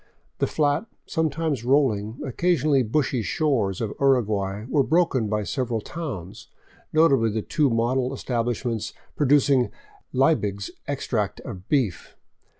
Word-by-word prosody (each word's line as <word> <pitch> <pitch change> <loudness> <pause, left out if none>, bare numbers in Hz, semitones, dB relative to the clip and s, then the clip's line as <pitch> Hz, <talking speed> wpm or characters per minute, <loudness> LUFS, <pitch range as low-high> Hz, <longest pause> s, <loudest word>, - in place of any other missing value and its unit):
The - - +2
flat, 150 +7 +1 0.2
sometimes 160 - -1
rolling, 120 -4 +1
occasionally 150 -1 +2
bushy 125 +1 0
shores 110 - 0
of 110 - -1
the - - -8
Uruguay 105 -6 +1
were 140 +2 +2
broken 155 -6 +2
by 105 0 -1
several 120 0 -2
towns, 105 - -7 0.4
notably 140 -8 +4
the 110 0 -2
two 150 -3 +1
model 125 +2 +1
establishments 120 -3 -2 0.2
producing 140 -3 +3 0.4
Leibig's 105 -8 +1 0.2
ex - - -3
tract - - -1
of 95 0 -9
beef. 125 - -1
130 Hz, 125 wpm, -24 LUFS, 110-145 Hz, 0.4 s, notably